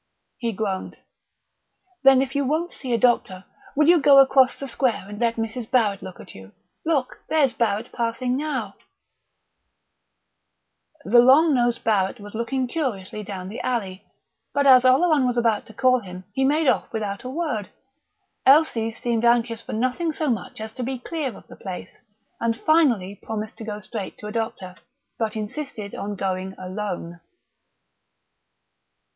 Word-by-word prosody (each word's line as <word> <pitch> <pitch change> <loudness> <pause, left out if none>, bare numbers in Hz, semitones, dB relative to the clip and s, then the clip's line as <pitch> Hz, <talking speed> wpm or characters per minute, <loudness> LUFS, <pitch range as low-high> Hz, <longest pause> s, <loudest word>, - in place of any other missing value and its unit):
He 235 -3 -1
groaned. 195 -2 -4 1.0
"Then 270 -1 +6
if 270 0 -6
you 280 - +2
won't 315 +6 -1
see 255 - -6
a 235 - +3
doctor, 205 -5 +1 0.3
will 300 +1 +3
you 345 -2 +6
go 280 0 +7
across 265 -1 +6
the 275 - -6
square 250 -5 0
and 205 0 -8
let 235 -1 +1
Mrs. 225 +1 -4
Barrett 220 -6 +2
look 185 -1 -9
at - - -11
you? 95 +1 -13 0.3
Look, 295 -6 -1
there's 295 -4 +3
Barrett 220 0 -1
passing 245 +2 -1
now 300 +2 -3 1.1
" 315 -3 -37
The 240 +4 +6
long 280 +6 +6
nosed 240 -2 +1
Barrett 205 0 +1
was 205 0 -10
looking 245 +4 -1
curiously 225 - -3
down 190 -3 -6
the 205 - -6
alley, 200 -7 -3 0.5
but 285 0 +2
as 255 -2 +7
Oleron 280 +1 +4
was 245 -1 -1
about 230 -3 +1
to 220 - -13
call 255 +1 +3
him 185 -4 -10
he 265 - 0
made 300 +2 +2
off - - +1
without 205 -2 -4
a 255 - -5
word. 270 - -3 0.7
Elsie 265 -6 +4
seemed 230 0 -2
anxious 235 -1 +2
for - - -8
nothing 255 +9 0
so 305 -2 -1
much 215 -3 -4
as 220 0 -7
to 255 - -6
be 260 +2 -3
clear 270 - -4
of - - -16
the - - -13
place, 185 -2 -8 0.4
and 230 -1 -1
finally 240 - +2
promised 215 -1 -5
to - - -8
go 210 -1 -5
straight 210 -1 -6
to - - -11
a 210 - -5
doctor, 210 -5 -4 0.4
but 220 -2 -1
insisted 215 -1 -5
on 205 0 -4
going 190 0 -3
alone. 185 -2 -5
235 Hz, 165 wpm, -23 LUFS, 210-270 Hz, 1.1 s, go